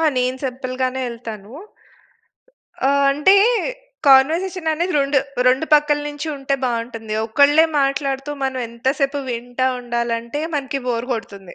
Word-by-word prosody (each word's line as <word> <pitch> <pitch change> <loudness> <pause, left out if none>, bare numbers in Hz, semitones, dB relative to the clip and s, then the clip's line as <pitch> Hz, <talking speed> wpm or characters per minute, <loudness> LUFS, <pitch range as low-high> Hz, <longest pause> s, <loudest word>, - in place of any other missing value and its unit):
ఆ! - - 0 0.2
నేను 250 +1 0
సింపుల్‌గానే 255 0 -3
ఎళ్తాను. 225 -3 -9 1.4
ఆహ్, 280 0 +3
అంటే 295 +8 +4 0.7
కన్వర్జేషన్ 320 +6 +4
అనేది 345 +4 -1
రెండు, 275 0 +2 0.3
రెండు 260 +5 +2
పక్కల 295 0 +3
నుంచి 290 +1 -6
ఉంటే 275 0 -1
బావుంటుంది. 230 -2 -3
ఒకళ్ళే 285 +7 +5 0.2
మాట్లాడుతూ 275 0 -1
మనం 265 -1 -2
ఎంత 235 +2 -12
సేపు 280 +1 0
వింటా 245 +2 -2
ఉండాలంటే 235 +2 -3
మనకు 275 -1 -2
బోర్ 235 0 -1
కొడుతుంది. 200 -5 -7
265 Hz, 125 wpm, -20 LUFS, 235-285 Hz, 1.4 s, ఒకళ్ళే